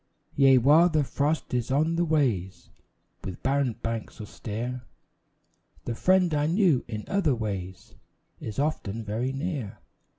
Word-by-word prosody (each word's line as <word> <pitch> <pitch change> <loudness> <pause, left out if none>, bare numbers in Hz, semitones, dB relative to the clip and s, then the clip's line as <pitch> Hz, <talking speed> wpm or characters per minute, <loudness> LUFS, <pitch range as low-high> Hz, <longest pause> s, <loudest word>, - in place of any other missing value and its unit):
Yea, 135 -2 +6
while 150 +8 +6
the 155 -3 +2
frost 145 +3 -1
is 120 -2 -1
on 155 +5 +1
the 170 - +1
ways 125 - -1 0.5
With 95 - -7
barren 135 -2 +1
banks 115 0 -4
austere, 115 +4 -5 1.0
The 120 - -2
friend 185 +5 +3
I 150 0 +1
knew 170 - +3
in 110 -2 -5
other 175 -10 +1
days 95 -4 -5 0.5
Is 110 - -7
often 115 -7 -2
very 110 +5 -2
near. 135 - -4
135 Hz, 135 wpm, -27 LUFS, 110-155 Hz, 1.0 s, Yea